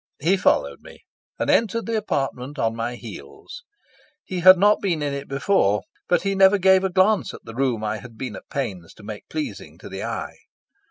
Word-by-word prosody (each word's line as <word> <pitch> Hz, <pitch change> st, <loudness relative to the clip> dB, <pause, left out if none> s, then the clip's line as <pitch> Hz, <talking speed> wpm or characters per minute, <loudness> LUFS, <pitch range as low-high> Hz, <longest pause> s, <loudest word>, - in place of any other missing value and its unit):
He 170 Hz, +7 st, +3 dB
followed 185 Hz, -, +1 dB
me, -, -, -15 dB, 0.3 s
and -, -, -2 dB
entered 230 Hz, +1 st, +2 dB
the 230 Hz, -, -2 dB
apartment 140 Hz, -, -2 dB
on 115 Hz, -3 st, 0 dB
my 115 Hz, +1 st, -3 dB
heels. -, -, -11 dB, 0.6 s
He 185 Hz, -, -4 dB
had 185 Hz, +2 st, +8 dB
not 205 Hz, +3 st, +4 dB
been 170 Hz, -6 st, -1 dB
in 145 Hz, -1 st, -2 dB
it 140 Hz, 0 st, -5 dB
before, 135 Hz, -, +1 dB, 0.3 s
but 175 Hz, -, +2 dB
he 195 Hz, 0 st, 0 dB
never 195 Hz, +1 st, +5 dB
gave 190 Hz, 0 st, +4 dB
a 190 Hz, -, +1 dB
glance 195 Hz, +3 st, +2 dB
at -, -, -12 dB
the 115 Hz, -, -9 dB
room 125 Hz, -3 st, -1 dB
I 110 Hz, 0 st, -2 dB
had 115 Hz, +1 st, -13 dB
been 120 Hz, -3 st, -5 dB
at -, -, -12 dB
pains 100 Hz, -11 st, -5 dB
to 110 Hz, -, -16 dB
make 105 Hz, 0 st, -9 dB
pleasing 150 Hz, -, -6 dB
to -, -, -11 dB
the -, -, -6 dB
eye. -, -, -5 dB
145 Hz, 205 wpm, -23 LUFS, 115-190 Hz, 0.6 s, had